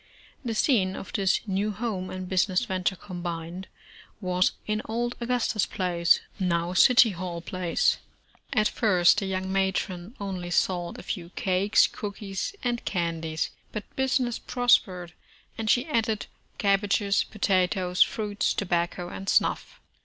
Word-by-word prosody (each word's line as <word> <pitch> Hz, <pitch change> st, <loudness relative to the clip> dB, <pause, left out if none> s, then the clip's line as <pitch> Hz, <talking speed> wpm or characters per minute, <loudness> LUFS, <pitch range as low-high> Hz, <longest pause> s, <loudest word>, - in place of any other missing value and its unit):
The 230 Hz, -3 st, -2 dB
scene 200 Hz, -7 st, +2 dB
of -, -, -8 dB
this 195 Hz, -2 st, +2 dB
new 200 Hz, +1 st, 0 dB
home 205 Hz, -3 st, -3 dB
and 185 Hz, 0 st, -6 dB
business 185 Hz, +3 st, +1 dB
venture 190 Hz, -2 st, -1 dB
combined, 175 Hz, 0 st, -6 dB, 0.5 s
was 185 Hz, -2 st, +1 dB
in 215 Hz, 0 st, -1 dB
old 240 Hz, +2 st, -2 dB
Augustus 235 Hz, -3 st, 0 dB
Place, 175 Hz, -3 st, +2 dB, 0.2 s
now 175 Hz, -1 st, 0 dB
City 235 Hz, +3 st, +6 dB
Hall 175 Hz, -1 st, -5 dB
Place. 175 Hz, 0 st, 0 dB, 0.5 s
At 215 Hz, -4 st, +3 dB
first 185 Hz, -3 st, +4 dB
the 195 Hz, -, -3 dB
young 190 Hz, 0 st, -2 dB
matron 190 Hz, +1 st, -1 dB
only 185 Hz, -3 st, -4 dB
sold 175 Hz, -1 st, 0 dB
a -, -, -9 dB
few 175 Hz, -3 st, -5 dB
cakes, 190 Hz, +2 st, +3 dB
cookies, 200 Hz, -, -5 dB
and 240 Hz, -1 st, -1 dB
candies, 165 Hz, -3 st, -2 dB, 0.2 s
but 215 Hz, -2 st, -7 dB
business 260 Hz, -2 st, 0 dB
prospered, 190 Hz, -8 st, +1 dB, 0.4 s
and 220 Hz, -1 st, -3 dB
she 245 Hz, -, +3 dB
added 225 Hz, -7 st, 0 dB, 0.3 s
cabbages, 200 Hz, 0 st, +2 dB
potatoes, 185 Hz, -3 st, 0 dB
fruits, 210 Hz, -2 st, +2 dB
tobacco 175 Hz, -2 st, -1 dB
and 195 Hz, +2 st, -5 dB
snuff. -, -, +1 dB
190 Hz, 130 wpm, -27 LUFS, 180-215 Hz, 0.5 s, City